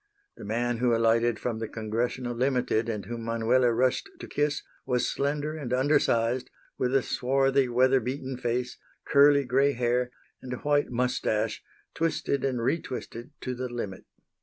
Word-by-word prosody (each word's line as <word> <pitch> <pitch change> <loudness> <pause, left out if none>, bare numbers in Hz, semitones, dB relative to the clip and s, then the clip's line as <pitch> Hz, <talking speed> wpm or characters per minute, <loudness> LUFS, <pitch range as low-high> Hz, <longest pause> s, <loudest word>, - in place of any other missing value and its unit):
The - - -11
man 120 +2 -1
who 120 -1 +3
alighted 115 0 +3
from 115 0 -3
the 115 - -3
Congressional 120 +3 -2
Limited 125 -3 +1
and 105 -4 -3
whom 115 +3 -5
Manuela 115 +2 +2
rushed 130 - +1
to - - -7
kiss 145 0 -1 0.2
was 125 -1 0
slender 145 +2 -1
and 140 -6 -5
undersized, 125 -3 +2 0.3
with 130 +1 0
a 135 - +3
swarthy, 135 +1 +2
weather 130 +2 +4
beaten 130 +2 -4
face, 125 0 -2 0.3
curly 140 0 +5
gray 135 +3 +3
hair 125 0 0 0.3
and 125 - -6
a - - -3
white 145 +1 +1
moustache, 115 -3 0 0.3
twisted 160 -4 -1
and 125 -4 -1
re 160 +7 +1
twisted 120 -1 -7
to 130 - -3
the 125 0 -4
limit. 105 -6 -5
125 Hz, 160 wpm, -27 LUFS, 115-135 Hz, 0.3 s, curly